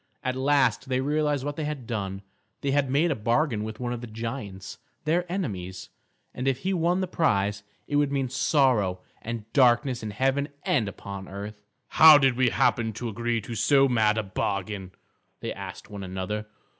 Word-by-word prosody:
At 130 0 -1
last 135 0 +2
they 130 0 +1
realised 145 0 0
what 145 0 -4
they 155 - -2
had 150 -4 -4
done; 100 -4 -4 0.4
they 140 - 0
had 140 -1 +2
made 155 +6 +2
a - - +1
bargain 115 +1 +1
with 110 0 -6
one 120 -1 -2
of 120 - -5
the 120 - -7
giants, 110 -4 -6 0.2
their 175 +3 0
enemies; 95 - -4 0.4
and 130 +1 -3
if 135 -1 +1
he 190 - 0
won 175 +1 +1
the 185 - -1
prize, 105 - +1 0.3
it 145 - 0
would 145 -1 +2
mean 135 -2 0
sorrow 125 - +2 0.2
and 115 -2 -5
darkness 125 -1 +3
in 110 - -4
heaven 135 +7 0
and 115 -7 +1
upon 100 -1 -7
earth. 105 +2 -7 0.3
"How 155 -1 +9
did 135 -3 +3
we 130 0 +3
happen 115 -1 +1
to 120 +2 -4
agree 115 +1 -1
to 115 - -7
so 135 +4 +4
mad 110 -4 +2
a 110 - 0
bargain?" 100 0 -3 0.5
they - - -4
asked - - -9
one 100 -1 -6
another. 95 +3 -4
120 Hz, 185 wpm, -26 LUFS, 105-140 Hz, 0.5 s, How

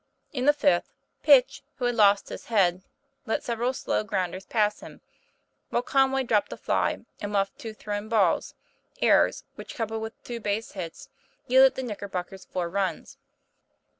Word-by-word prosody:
In 255 -2 -2
the 295 - +7
fifth, 175 -11 +1 0.3
Pitch, 275 -5 +5
who 250 - -3
had 245 - +2
lost 205 -3 +4
his - - -8
head, 185 -5 +2 0.5
let 220 - -1
sev 235 -2 -3
eral 250 +2 0
slow 215 - -1
grounders 190 -2 -3
pass 210 -2 +1
him, - - -12 0.7
while 240 - 0
Conway 270 0 +2
dropped 215 -4 +1
a - - -6
fly - - -1 0.2
and 205 -1 -4
muffed 195 -1 -1
two 220 -1 -7
thrown 205 0 -5
balls 205 -7 +2 0.4
errors - - +3
which, - - -10
coupled 225 -1 -3
with 220 0 -8
two 240 -1 -5
base 210 +1 -2
hits, 175 -4 -7 0.4
yielded 260 +1 +6
the 260 - -4
Knicker 210 -4 -5
bockers 185 +1 -6
four 180 -2 -3
runs. 190 +2 -3
215 Hz, 165 wpm, -26 LUFS, 195-245 Hz, 0.7 s, the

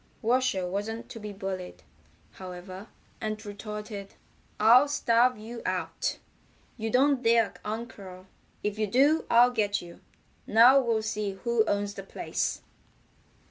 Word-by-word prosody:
Washer 235 -5 +1
wasn't 210 +5 -4
to 225 - -8
be 210 -1 -7
bullied, 190 -2 -6 0.5
however, 185 +2 -9 0.3
and 215 -1 -4
retorted: 210 -1 -7 0.4
"I'll 240 +6 +7
starve 250 -3 +2
you 230 +2 -8
out. - - -2 0.6
You 225 -1 -3
don't 265 +3 +3
dare 230 -2 +3
uncurl. 200 -4 -7 0.4
If 210 +1 -2
you 215 - +1
do 280 +9 +3
I'll 240 +1 +6
get 205 -4 0
you. 170 -1 -12 0.5
Now 240 +5 +7
we'll 230 -3 0
see 210 -2 -2
who 220 +4 +1
owns 205 0 -1
the 195 - -7
place." 195 - -3
215 Hz, 130 wpm, -28 LUFS, 200-235 Hz, 0.6 s, I'll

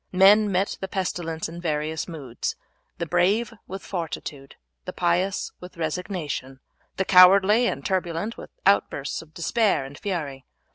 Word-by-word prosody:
Men 200 +3 +6
met 190 +2 0
the 190 - -2
pestilence 175 -4 -3
in 170 +2 -8
various 155 -1 -2
moods: 140 -9 -5 0.4
the 170 - -2
brave 195 +7 +2
with 190 +1 -7
fortitude, 150 -6 -6 0.3
the - - -5
pious 180 +2 0
with 180 -1 -11
resignation, 155 -5 -4 0.4
the 190 - +1
cowardly 195 +6 +7
and - - -3
turbulent 185 +3 -1
with - - -10 0.2
outbursts 185 -7 +1
of 160 -1 -18
despair 195 - +1
and 135 +1 -10
fury. 150 -10 -4
175 Hz, 140 wpm, -25 LUFS, 160-195 Hz, 0.4 s, cowardly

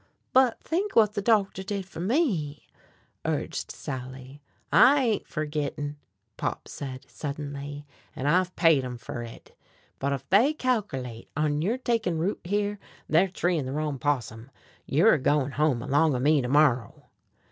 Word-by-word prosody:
"But 255 -2 +4
think 385 +5 -1
whut 215 -2 +4
the 205 - -2
doctor 200 -3 +2
did 195 0 -4
fer 190 - -11
me," 185 - 0 0.6
urged - - -2
Sally. 130 +1 -7 0.3
"I 285 +2 +7
ain't 225 -4 0
fergittin'," 150 -1 -3 0.4
Pop - - -3
said 130 -2 -7
suddenly, 145 0 -6 0.3
"an' 130 - -4
I've 180 +4 +2
paid 165 -6 +4
'em 125 -1 -5
fer 120 0 -6
hit. 115 -1 -11 0.4
But 140 - -1
ef 140 - -4
they 245 +11 +5
calkerlate 135 - -2
on 150 -1 +1
yer 215 +9 0
takin' 230 -9 0
root 180 +6 -1
here, 205 +2 -1 0.3
they're 170 +5 +4
treein' 175 -6 -1
the 130 - -4
wrong 150 -2 -2
possum. 125 -4 -2 0.4
You're 170 +11 +5
a 155 - +2
goin' 145 0 +1
home 140 -4 +1
along 145 +1 +2
o' - - -1
me 145 +2 +3
to 125 - -3
morrow." 130 -6 +2
150 Hz, 155 wpm, -27 LUFS, 140-200 Hz, 0.6 s, I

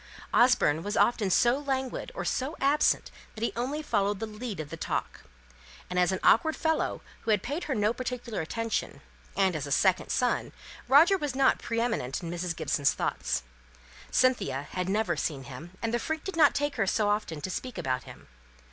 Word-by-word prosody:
Osborne 240 - +4
was 205 +4 -3
often 220 -4 +3
so 240 +8 +4
languid 265 - -3
or - - -4
so 270 +5 -1
absent 280 +2 +2 0.2
that 220 - -5
he 235 - 0
only 270 +6 -2
followed 205 -6 0
the 225 - -2
lead 215 -2 -6
of 150 -2 -6
talk; - - -3 0.7
and 180 - +1
as 180 +1 +3
an 190 - -1
awkward 315 -1 +4
fellow, 320 -1 0 0.2
who - - -7
had 210 -3 +3
paid 290 +7 -3
her 275 - -1
no 210 +1 +2
particular 245 -4 -4
attention, 230 +7 -3 0.4
and 190 -3 +3
as 145 -2 -3
a - - -7
second 185 +5 +2
son, 250 -2 0 0.3
Roger 335 +8 +6
was 290 -5 -3
not 265 0 +3
pre 230 0 -2
eminent 225 - -1
in 170 - -4
Mrs. 175 -1 -3
Gibson's 145 -4 +1
thoughts; 60 0 -2 0.7
Cynthia 190 - +2
had 185 0 -2
never 200 -4 +1
seen 145 -2 -3
him, 140 +6 -9
and 230 0 -1
the 240 - +2
freak 315 +5 -3
did 385 - -5
not 310 -3 +5
take 290 -1 -1
her 195 -4 +1
often 205 -6 0
to 185 +6 -4
speak 255 +5 -5
about 130 -1 -2
him. - - -13
220 Hz, 190 wpm, -28 LUFS, 180-260 Hz, 0.7 s, Roger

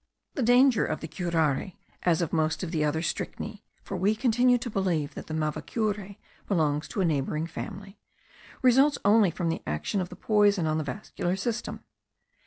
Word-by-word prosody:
The - - -2
danger 245 0 +5
of - - -2
the 160 - -6
curare, 165 -1 0 0.3
as 175 -1 +2
of 165 - -4
most 160 0 +1
of 170 - -4
the 155 -3 0
other 150 +1 0
strychneae 210 +5 -4 0.2
(for 195 - -5
we 195 +4 +2
continue 245 +1 +3
to 240 0 -5
believe 175 -8 0
that - - -8
the 155 - -5
mavacure 200 +6 -2 0.3
belongs 150 -5 +1
to 195 - -2
a - - +3
neighbouring 150 0 0
family), 195 +3 -8 0.6
results 270 +4 +5
only 205 -1 +5
from 170 0 -2
the 165 - -2
action 75 - -1
of 180 - -4
the 180 - -9
poison 205 -3 +3
on 155 0 +1
the - - -1
vascular 160 +6 -3
system. 230 +4 -3
185 Hz, 180 wpm, -27 LUFS, 160-215 Hz, 0.6 s, danger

